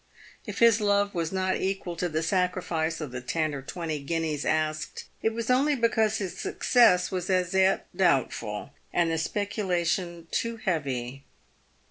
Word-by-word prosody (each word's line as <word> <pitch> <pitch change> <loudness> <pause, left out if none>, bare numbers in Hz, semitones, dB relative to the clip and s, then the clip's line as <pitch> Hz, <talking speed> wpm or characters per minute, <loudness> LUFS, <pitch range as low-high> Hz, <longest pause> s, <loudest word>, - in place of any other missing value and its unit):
If - - -5
his 230 -2 +5
love 205 0 +2
was 165 -3 -2
not 190 0 0
equal 190 -2 -2
to 175 +1 -1
the 160 0 -1
sacrifice 170 -3 0
of 150 -5 -5
the 125 -1 -5
ten 155 +4 -1
or 140 - -4
twenty 160 +2 -4
guineas 155 0 -2
asked, 155 0 -1 0.2
it 220 - +2
was 230 +2 -2
only 280 +4 +3
because 225 -3 +2
his 190 -3 -4
success 225 -8 +3
was 185 -1 -3
as 185 -1 +1
yet 190 0 +3
doubtful, 135 - 0 0.2
and 170 -1 +2
the 160 - 0
speculation 175 -3 -1
too 230 0 -1
heavy. 135 - -2
175 Hz, 155 wpm, -27 LUFS, 155-200 Hz, 0.2 s, his